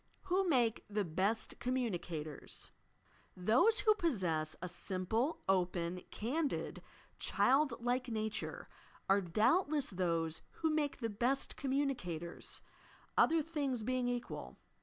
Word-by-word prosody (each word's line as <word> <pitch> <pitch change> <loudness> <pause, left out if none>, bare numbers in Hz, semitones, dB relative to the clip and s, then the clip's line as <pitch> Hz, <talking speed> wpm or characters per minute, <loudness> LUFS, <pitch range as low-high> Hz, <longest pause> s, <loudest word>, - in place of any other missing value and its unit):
WHO 380 0 +1
MAKE 240 -6 +2
THE 205 -1 0
BEST 190 +7 -1
COMMUNICATOBS 175 - -3
I - - -38 0.3
Those 300 - +5
who 430 - +6
possess 185 - 0
a 180 - -4
simple, 195 - 0
open, 180 -1 +1
candid 280 +7 -2 0.4
child 275 -1 +3
like 245 +2 0
nature, 220 -1 -3 0.4
are 195 +1 +4
doubtless 285 - +2
those 165 -3 0
who 320 -1 0
make 295 -3 0
the 230 - 0
best 245 +6 0
"communi 275 0 +1
cators," 170 -5 -5 0.3
— - - -27
other 325 -1 +5
things 285 -7 -2
being 250 +1 0
equal. 245 0 -4
235 Hz, 120 wpm, -36 LUFS, 180-280 Hz, 0.4 s, who